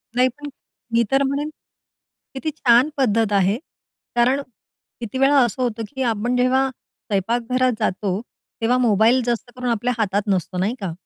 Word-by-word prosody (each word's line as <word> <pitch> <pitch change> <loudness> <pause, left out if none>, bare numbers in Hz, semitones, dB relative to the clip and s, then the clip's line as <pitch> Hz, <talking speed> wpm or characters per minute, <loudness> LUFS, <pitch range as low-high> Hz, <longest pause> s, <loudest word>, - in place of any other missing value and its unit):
नाही. 250 +1 +4
पण, 290 0 -7 0.4
मी 235 0 +4
तर 270 +1 +3
म्हणेन, 280 +2 -1 0.8
किती 270 +4 -3
छान 255 -2 +4
पद्धत 225 -5 +2
आहे. 200 +1 +3 0.6
कारण, 250 +4 +3 0.6
किती 235 +1 -5
वेळा 275 +2 +4
असं 240 +2 -4
होतं, 230 -2 -2
की 265 - -3
आपण 230 +3 -1
जेव्हा 260 +2 +2
स्वयंपाकघरात 240 +3 -1
जातो, 195 -2 -1 0.4
तेव्हा 240 +3 +2
मोबाईल 230 +1 +4
जास्त 240 +1 -2
करून 250 -1 -3
आपल्या 235 +2 0
हातात 205 -2 +1
नसतो, 185 -2 -1
नाही 200 +7 0
का? 195 -4 -3
240 Hz, 150 wpm, -21 LUFS, 210-260 Hz, 0.8 s, नाही